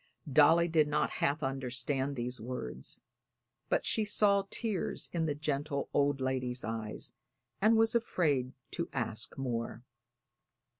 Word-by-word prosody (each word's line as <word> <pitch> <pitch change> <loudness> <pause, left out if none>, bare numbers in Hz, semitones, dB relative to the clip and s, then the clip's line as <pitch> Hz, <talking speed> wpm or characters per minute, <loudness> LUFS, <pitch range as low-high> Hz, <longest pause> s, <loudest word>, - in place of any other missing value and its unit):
Dolly 160 +4 +6
did 160 -3 +3
not 150 - +1
half 145 +2 +1
understand 135 +1 -1
these 125 -1 -3
words, 90 - -5 0.7
but - - +1
she 220 - +2
saw 200 -1 +3
tears 220 -6 -2
in 165 -2 +1
the 145 - 0
gentle 145 -1 -2
old 145 -1 +2
lady's 130 -1 0
eyes 110 -1 -4 0.5
and 220 +2 +5
was 225 0 +4
afraid 150 - +1 0.2
to - - -3
ask 110 +2 -3
more. 120 -3 -3
140 Hz, 130 wpm, -32 LUFS, 125-165 Hz, 0.7 s, Dolly